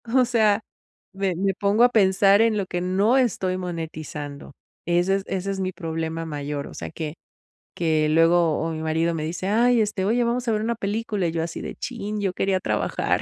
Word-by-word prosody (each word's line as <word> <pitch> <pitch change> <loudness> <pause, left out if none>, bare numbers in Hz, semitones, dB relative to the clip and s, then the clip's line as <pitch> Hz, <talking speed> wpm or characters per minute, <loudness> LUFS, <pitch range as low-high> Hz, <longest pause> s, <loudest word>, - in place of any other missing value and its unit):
o 255 -1 +6
sea, 220 -3 +3 0.5
me 195 -2 -1
me 195 +2 0
pongo 205 +4 +2
a 245 - +7
pensar 200 -2 +4
en 225 -2 +3
lo 200 - -1
que 175 -1 -3
no 195 +7 +2
estoy 190 -7 +1
monetizando. 155 -5 -6 0.3
Ese 175 +3 +2
es 195 - -2
ese 195 +1 -2
es 195 - -4
mi 185 0 -1
problema 165 -1 -4
mayor. 145 -2 -4
O - - -11
sea, - - -6
que 155 -1 -5 0.6
que 155 -2 +1
luego, 165 0 +4
o 165 +1 -2
mi 160 0 -4
marido 160 +1 0
me 155 - -3
dice: 175 +4 -3
"Ay, 235 +2 +4
este, 205 -3 -1
oye, 235 +4 +2
vamos 240 +1 -1
a - - +2
ver 215 -1 0
una 235 +1 -1
película", 210 -2 -2
y 165 - -1
yo 165 -1 -1
así 165 - -5
de: - - -6
"¡Chin!, 215 -4 -5
yo 190 -2 0
quería 190 0 0
trabajar", - - 0
190 Hz, 210 wpm, -24 LUFS, 165-210 Hz, 0.6 s, a